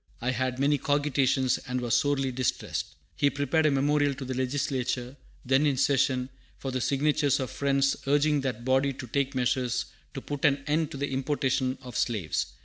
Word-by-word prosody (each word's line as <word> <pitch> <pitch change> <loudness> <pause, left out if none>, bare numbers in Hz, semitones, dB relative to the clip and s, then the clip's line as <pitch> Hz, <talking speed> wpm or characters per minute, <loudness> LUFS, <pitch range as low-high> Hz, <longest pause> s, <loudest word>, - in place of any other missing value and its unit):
I 125 +2 0
had 130 0 -1
many 140 +2 +2
cogitations, 135 -2 +1
and 125 0 -1
was 120 -2 -2
sorely 140 -3 +2
distressed." 130 0 -2 0.2
He 145 - +3
prepared 145 +3 +1
a - - +4
memorial 145 0 +2
to 135 - -6
the 130 - -3
Legislature, 130 -1 -2 0.3
then 135 +4 +3
in 140 -3 +1
session, 135 -1 +2 0.3
for 135 - -4
the 130 0 -2
signatures 145 +2 +2
of 130 -2 -3
Friends, 140 -1 +1
urging 145 +1 +3
that 125 -3 -3
body 135 +1 +2
to 130 0 -8
take 140 +3 -1
measures 125 -1 0 0.3
to - - -3
put 145 0 -6
an 140 -1 +3
end 155 +1 +1
to - - -7
the 145 +1 -2
importation 130 -1 0
of 125 -1 -9
slaves. 105 -9 -1
135 Hz, 180 wpm, -28 LUFS, 130-145 Hz, 0.3 s, a